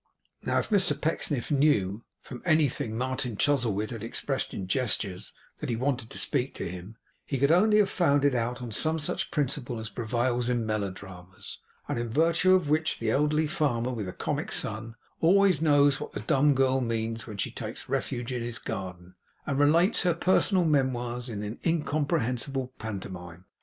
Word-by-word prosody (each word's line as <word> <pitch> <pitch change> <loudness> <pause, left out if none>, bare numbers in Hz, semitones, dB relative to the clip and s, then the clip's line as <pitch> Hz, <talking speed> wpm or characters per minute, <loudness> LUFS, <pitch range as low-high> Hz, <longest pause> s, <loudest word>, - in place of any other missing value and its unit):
Now - - 0
if - - -1
Mr 195 -3 +2
Pecksniff 150 -4 -1
knew, 120 -8 +2 0.2
from 125 - -9
anything 150 -9 +1
Martin 130 -2 -2
Chuzzlewit 115 -7 +1
had 115 -3 -6
expressed 135 +4 -2
in 95 - -5
gestures, 100 -4 -1 0.3
that 150 - -4
he 120 - 0
wanted 125 -1 -1
to - - -9
speak 130 +2 -1
to - - -4
him, 90 +5 -8 0.3
he 135 - -3
could 140 +3 +3
only 210 +5 +5
have 205 -2 +4
found 145 -5 +3
it 140 - +4
out 125 +1 -2
on 120 - -6
some 155 +9 0
such 150 - -3
principle 135 -5 -2
as 110 0 -5
prevails 120 +2 -1
in 120 -2 0
melodramas, 95 -3 -6 0.3
and - - -2
in 120 0 -3
virtue 165 +7 +4
of 180 -5 +1
which 155 +2 +1
the 115 -1 -1
elderly 150 +4 +2
farmer 140 -7 0
with 110 -6 -4
the - - -4
comic - - -3
son 110 +2 -2 0.2
always 185 -1 +4
knows 145 -2 +4
what - - -6
the - - -4
dumb 145 -2 +3
girl 130 0 +2
means 115 -2 -2
when 105 -3 -7
she - - -2
takes - - -7
refuge 120 +1 -2
in 125 -1 -2
his 120 0 -4
garden, 90 -3 -6 0.3
and 140 0 -1
relates 165 +8 +4
her 175 -3 +2
personal 185 +1 +3
memoirs 125 -4 0
in 105 0 -5
incomprehensible 140 -5 -1
pantomime. 95 -4 -7
125 Hz, 175 wpm, -28 LUFS, 110-150 Hz, 0.3 s, only